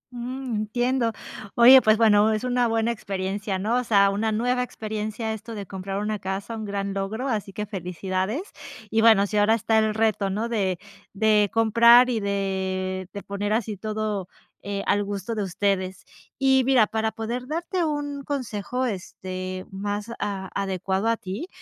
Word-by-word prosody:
Mm, 250 0 -4
entiendo. 240 +3 0 0.4
Oye, 255 +2 +9
pues, 215 0 +4
bueno, 215 -1 +5
es 215 +2 -2
una 245 -1 +1
buena 225 +1 +1
experiencia, 195 -2 -3
¿no? 220 +6 0
O 250 - 0
sea, 200 -4 +4
una 220 +2 0
nueva 245 +3 +1
experiencia 220 -1 -4
esto 220 +1 -8
de 200 -2 -6
comprar 195 +1 -5
una 210 0 -2
casa, 195 +4 -4
un 220 -1 -5
gran 200 -1 -3
logro, 210 +6 -3
así 210 -5 -2
que 210 +2 -4
felicidades. 190 - -3 0.5
Y 220 0 +3
bueno, 220 -3 +6
sí, 210 +1 -2
ahora 210 +2 +4
está 220 0 +2
el 215 -1 +1
reto, 215 -3 +1
¿no? 215 +4 -2
De 195 -6 0 0.4
de 210 0 +3
comprar, 235 +2 +6
y 230 - 0
de 190 -2 -2
de 200 - -7
poner 205 +1 -2
así 220 -1 -1
todo, 215 -2 -3 0.3
eh, 200 0 -4
al 205 - +2
gusto 200 +2 -4
de 215 - -2
ustedes. 190 0 -1 0.3
Y 265 0 +4
mira, 250 -4 +5
para 220 +1 -1
poder 235 +3 -4
darte 340 +4 -2
un 290 -2 -2
consejo, 255 -2 -3
este, 185 -2 -5
más 205 +3 -4
a 195 -2 -3
adecuado 195 +1 -1
a 230 - +2
ti, 195 - -6
215 Hz, 170 wpm, -25 LUFS, 195-230 Hz, 0.5 s, Oye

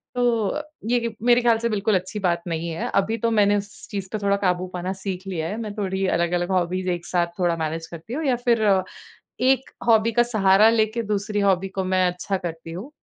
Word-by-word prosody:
तो 240 -4 +2
अ, 300 - -2 0.2
ये 240 +2 +2
कि 230 -1 -3
मेरे 245 0 +5
ख्याल 235 -1 +4
से 235 +1 0
बिल्कुल 210 -1 +1
अच्छी 185 +3 -2
बात 175 -3 0
नहीं 165 0 -2
है 165 - -3
अभी 210 +4 +1
तो 230 +1 0
मैंने 205 -2 +4
उस 205 +1 -8
चीज़ 195 -2 -5
पे 215 - 0
थोड़ा 200 0 +3
काबू 185 -2 0
पाना 180 +1 -3
सीख 190 -1 -5
लिया 165 -4 -2
है, 210 - -4
मैं 215 -3 -5
थोड़ी 195 -2 -1
अलग-अलग 175 +1 0
हॉबीज़ 185 0 0
एक 175 -1 -4
साथ 175 -1 +1
थोड़ा 175 -2 +2
मैनेज 160 +1 -3
करती 170 +7 -9
हूँ 310 +3 -2
या 260 -3 +3
फिर 230 -2 +3 0.9
एक 265 +1 +1 0.2
हॉबी 225 0 +4
का 240 - +4
सहारा 215 -2 +4
लेके 225 0 +1
दूसरी 210 0 -1
हॉबी 195 -1 +2
को 190 0 -3
मैं 185 0 +2
अच्छा 180 +2 -2
करती 165 -2 -6
हूँ। 195 - -7
195 Hz, 220 wpm, -23 LUFS, 180-225 Hz, 0.9 s, मेरे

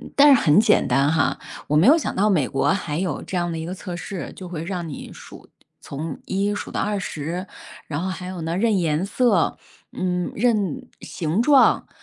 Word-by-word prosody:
但 290 +1 +7
是 260 - +5
很 150 +2 +5
简 215 -1 +3
单 140 +4 +2
哈， 160 -3 +1 0.3
我 150 - 0
没 170 +8 +5
有 305 +5 +7
想 325 - -3
到 205 +3 +2
美 160 -10 +2
国 135 - 0
还 170 -6 -1
有 180 -6 -2
这 - - -6
样 175 -1 -1
的 165 - -4
一 160 - -5
个 175 - -5
测 185 -1 -7
试， 180 +1 -6
就 185 - -9
会 165 -3 -5
让 175 -1 -4
你 145 - -8
数 - - -13 0.3
从 155 +4 -6
1 200 +2 -1
数 - - -6
到 - - -2
20， 180 -3 -3 0.4
然 145 0 -3
后 185 - -2
还 185 -1 -6
有 185 -2 -6
呢， 165 +2 -2
认 220 0 +2
颜 165 0 0
色， 205 -3 +1 0.3
嗯， 180 -1 -2
认 210 -7 0
形 170 +4 -2
状， 275 +1 +4
180 Hz, 210 characters per minute, -22 LUFS, 160-200 Hz, 0.4 s, 但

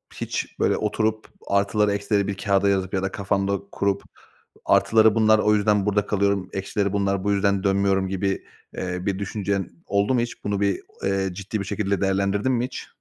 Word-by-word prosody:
hiç - - -4
böyle - - +2
oturup 110 +1 -1 0.2
artıları 100 +1 +2
eksileri 100 0 0
bir 100 -1 -3
kâğıda 100 0 +2
yazıp 95 -1 0
ya 95 -1 0
da 95 - -1
kafanda 100 0 -1
kurup 100 0 -1 0.6
artıları 110 -1 +4
bunlar, 110 -1 +5
o 105 0 +3
yüzden 105 -1 +2
burada 105 0 +1
kalıyorum. 100 -2 0
Eksileri 100 +1 -1
bunlar. 100 -1 0
Bu 100 - +1
yüzden 100 -1 +1
dönmüyorum 95 -1 +2
gibi, 95 +1 -2 0.3
eee, 90 0 -4
bir 100 -1 -1
düşüncen 100 -1 -2 0.2
oldu 100 +5 +1
mu 125 - +2
hiç? 120 0 -5
Bunu 100 0 -1
bir, 100 -2 +1 0.2
eee, 95 0 0
ciddi, 100 +4 -4
bir, 100 - -4
şekilde 100 -1 -1
değerlendirdin 100 +4 +1
mi 120 -1 +1
hiç? 130 - -7
100 Hz, 180 wpm, -24 LUFS, 95-105 Hz, 0.6 s, bunlar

